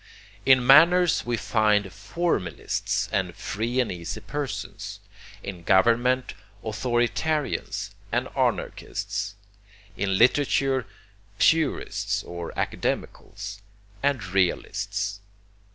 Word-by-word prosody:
In 130 -2 +6
manners 165 +3 +6
we 120 -1 0
find 105 -2 +2
formalists 165 - -1
and - - -1
free 115 +5 -2
and 125 - +1
easy 85 -2 -5
persons. 145 -2 -5 0.4
In 95 -3 -6
government, 120 +8 +3 0.3
authoritarians 120 +7 -1 0.2
and - - 0
anarchists. 105 -1 -2 0.6
In 95 0 0
literature, 135 +1 +3 0.5
purists 160 -3 +1
or 85 -1 -6
academicals, 100 0 -3 0.4
and 140 -6 +1
realists. 100 +2 -1
115 Hz, 85 wpm, -25 LUFS, 100-135 Hz, 0.6 s, In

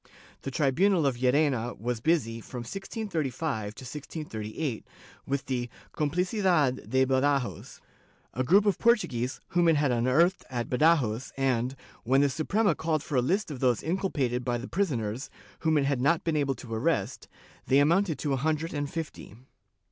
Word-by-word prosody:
The - - -4
tribunal 160 +6 +2
of 135 -3 +1
Llerena 125 -2 +1
was 120 +1 -2
busy, 115 -6 0
from 125 +2 -7
1635 155 - -3
to - - -10
1638, 130 -3 -5 0.4
with 140 0 -1
the 125 -2 -2 0.2
"compHcidad 170 - +1
de 130 0 +3
Badajoz," 135 0 0 0.5
a 130 - -1
group 195 +10 +4
of 200 -4 +1
Portuguese, 135 - +1
whom 175 -1 +2
it 165 - +5
had 145 -3 +2
unearthed 130 +10 +2
at 120 -2 -4
Badajoz 130 -5 +2
and, 130 -1 0 0.3
when 135 +4 +3
the 145 - +3
Suprema 180 - +1
called 155 -1 -1
for 145 - -4
a 125 - +4
hst 185 - 0
of 135 - -6
those 125 -4 +1
inculpated 145 -9 -1
by 120 -1 0
the 120 +2 -6
prisoners, 130 - -2 0.3
whom 160 -1 +2
it 140 - +2
had 140 -3 0
not 160 +5 +2
been 165 -2 0
able 140 -3 +1
to 120 -2 -9
arrest, 110 - -1 0.4
they 135 - +4
amounted 165 +4 +3
to 145 -3 -1
a - - +1
hundred 155 +4 -1
and 145 -1 -2
fifty 160 -10 -6
140 Hz, 165 wpm, -28 LUFS, 125-165 Hz, 0.5 s, it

